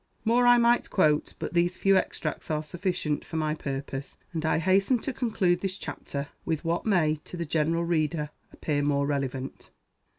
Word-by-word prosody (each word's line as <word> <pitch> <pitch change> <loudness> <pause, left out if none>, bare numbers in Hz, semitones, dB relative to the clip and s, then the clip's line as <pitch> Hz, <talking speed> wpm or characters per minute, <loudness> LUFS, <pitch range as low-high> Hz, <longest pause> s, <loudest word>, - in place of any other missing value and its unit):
More 240 +2 +4
I 245 0 +8
might 235 0 +3
quote; 155 -5 +2
but - - -5
these 175 +1 +2
few 195 0 +4
extracts 185 - -2
are 155 -1 0
sufficient 170 -2 -2
for 160 - -9
my 155 -1 0
purpose; 135 -2 -5 0.2
and 160 -1 -2
I 160 - +2
hasten 195 +8 +3
to 260 +3 -4
conclude 200 -8 +1
this 195 -1 -2
chapter 140 -6 -5
with 160 0 -2
what 170 +5 -1
may 160 -7 +3
to 180 - -8
the 170 - -2
general 165 +2 +1
reader 155 -2 0 0.2
appear 145 -2 -1
more 140 -1 +1
relevant. 135 -2 -3
165 Hz, 175 wpm, -27 LUFS, 150-190 Hz, 0.2 s, I